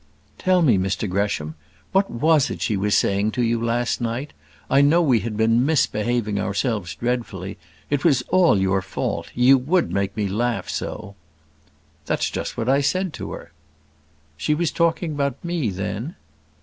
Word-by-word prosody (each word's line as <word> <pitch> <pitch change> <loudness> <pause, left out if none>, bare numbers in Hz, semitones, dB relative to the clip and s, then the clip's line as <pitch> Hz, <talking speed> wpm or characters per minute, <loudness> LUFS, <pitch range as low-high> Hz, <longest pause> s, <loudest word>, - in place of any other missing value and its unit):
"Tell 185 -1 +3
me, 120 -11 +4
Mr 95 +3 -1
Gresham, 90 -5 -1 0.4
what 195 +1 +2
was 150 +3 +2
it - - -4
she 110 - 0
was 100 +1 +2
saying 100 +2 +1
to 125 - 0
you 115 0 0
last 120 +1 0
night? 120 +5 -3 0.3
I 140 - +4
know 150 +4 +5
we 135 -9 +3
had 110 -1 -4
been 115 +2 +3
misbehaving 120 -7 0
ourselves 100 -2 -2
dreadfully. 110 -6 -3 0.3
It 145 -1 0
was 135 -7 +3
all 175 - +4
your 95 0 +1
fault; 95 - -4
you 130 +2 +5
would 165 +7 +1
make 100 0 -2
me 105 -2 0
laugh 115 +4 -1
so." 105 -2 -5 0.9
"That's - - 0
just - - -4
what 115 - -2
I 135 +2 +3
said 185 +4 0
to - - -6
her." 85 - -10 0.9
"She 150 - 0
was 165 0 0
talking 170 0 0
about 140 0 -2
me, 170 -9 -1
then?" 100 - -4
120 Hz, 165 wpm, -22 LUFS, 100-145 Hz, 0.9 s, know